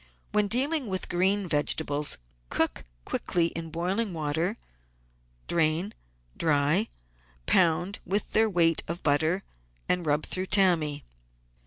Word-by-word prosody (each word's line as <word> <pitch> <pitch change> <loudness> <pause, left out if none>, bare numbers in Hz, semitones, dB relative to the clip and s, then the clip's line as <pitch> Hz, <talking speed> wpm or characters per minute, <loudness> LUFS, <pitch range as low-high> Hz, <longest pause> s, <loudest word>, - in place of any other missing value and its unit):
When 210 -1 +2
dealing 270 +5 +2
with 190 -2 -2
green 190 +2 +1
vegetables 150 -1 +1 0.3
cook - - 0 0.2
quickly 170 -1 0
in 165 -1 -6
boiling, 175 +5 -2
salted 190 - -8
water, 160 +7 -1 0.9
drain, 170 +5 0 0.4
dry, 155 +6 +2 0.6
pound 175 - +2
with 200 +3 -2
their 220 0 +3
weight 165 -4 +2
of 170 +2 -5
butter, 160 +6 +1 0.4
and 180 -1 +1
rub 150 0 0
through 185 0 -2
tammy. 170 -7 +3
175 Hz, 120 wpm, -27 LUFS, 155-195 Hz, 0.9 s, their